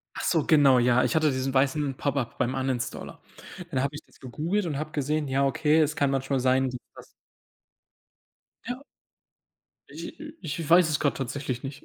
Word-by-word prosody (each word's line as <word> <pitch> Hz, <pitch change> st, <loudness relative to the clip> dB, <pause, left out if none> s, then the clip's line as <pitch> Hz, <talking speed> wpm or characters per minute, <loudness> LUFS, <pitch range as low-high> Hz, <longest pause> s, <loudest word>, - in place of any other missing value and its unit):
Ach -, -, -5 dB
so, 160 Hz, -4 st, +2 dB
genau, 140 Hz, -5 st, +5 dB
ja. 125 Hz, +1 st, +3 dB
Ich -, -, 0 dB
hatte 155 Hz, -2 st, +3 dB
diesen 130 Hz, 0 st, -2 dB
weißen 135 Hz, +1 st, +1 dB
Pop-up 140 Hz, -4 st, -2 dB
beim 125 Hz, +2 st, 0 dB
Uninstaller. 130 Hz, -2 st, -3 dB, 0.5 s
Dann 130 Hz, -4 st, 0 dB
habe 140 Hz, +2 st, -2 dB
ich 145 Hz, -, -7 dB
das -, -, -24 dB
gegoogelt 165 Hz, -, -2 dB
und 145 Hz, -4 st, -3 dB
habe 155 Hz, 0 st, -4 dB
gesehen, 150 Hz, 0 st, -1 dB
ja, 135 Hz, +1 st, +2 dB
okay, 155 Hz, +3 st, +2 dB
es 155 Hz, 0 st, +2 dB
kann 140 Hz, -1 st, +2 dB
manchmal 135 Hz, 0 st, 0 dB
sein, 130 Hz, +1 st, +3 dB
dass 125 Hz, -, -6 dB, 0.2 s
das -, -, -12 dB, 1.6 s
Ja. 245 Hz, +2 st, -4 dB, 1.1 s
Ich -, -, -9 dB
äh, -, -, -8 dB
ich 160 Hz, -1 st, -4 dB
weiß 175 Hz, 0 st, +6 dB
es 150 Hz, -2 st, 0 dB
grade 145 Hz, -, +1 dB
tatsächlich 130 Hz, -1 st, -4 dB
nicht. 135 Hz, +1 st, -8 dB
140 Hz, 180 wpm, -26 LUFS, 130-155 Hz, 1.6 s, weiß